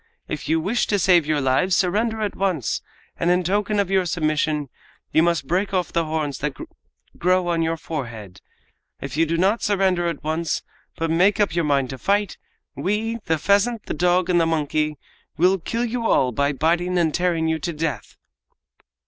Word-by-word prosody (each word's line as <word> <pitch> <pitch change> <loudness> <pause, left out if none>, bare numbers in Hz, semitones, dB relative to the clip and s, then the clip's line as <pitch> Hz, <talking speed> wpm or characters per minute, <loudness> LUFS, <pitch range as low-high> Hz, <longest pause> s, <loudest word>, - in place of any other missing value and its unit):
If 155 - -5
you 160 +1 +3
wish 205 +8 0
to 205 - +1
save 175 -4 +4
your 155 -1 +1
lives 135 +8 +2
surrender 220 +4 0
at 205 - -2
once, 180 - -1 0.4
and 170 - 0
in 180 +1 +3
token 205 +3 0
of 195 -2 0
your 190 -2 +2
submission 155 -3 0 0.4
you 160 - +4
must 170 -4 +1
break 190 +6 0
off 180 -1 -1
the 170 -1 +1
horns 155 -3 -2
that 145 -2 -3 0.6
grow 180 0 +2
on 170 -1 +1
your 165 0 0
forehead. 120 - -7 0.6
If 135 -1 -6
you 165 +1 +2
do 165 +1 0
not 195 +6 +2
surrender 190 -3 +1
at 165 -5 -4
once, 160 +1 -1 0.3
but 165 0 -1
make 185 +6 +3
up 205 -6 +2
your 170 -1 0
mind 140 -3 +1
to 130 - -7
fight, 200 - 0 0.4
we, 220 +4 -1
the 160 - +1
pheasant, 205 +7 +1
the - - -3
dog 180 +2 +2
and 175 -2 +3
the 165 - +2
monkey, 155 -1 0 0.4
will 185 +3 +3
kill 230 +8 -2
you 235 -1 -2
all 130 -1 +3
by 140 +4 +1
biting 170 +6 0
and 165 -3 +2
tearing 170 -2 +1
you 160 0 0
to 170 - -3
death!" 155 -1 -4
170 Hz, 190 wpm, -22 LUFS, 155-190 Hz, 0.6 s, save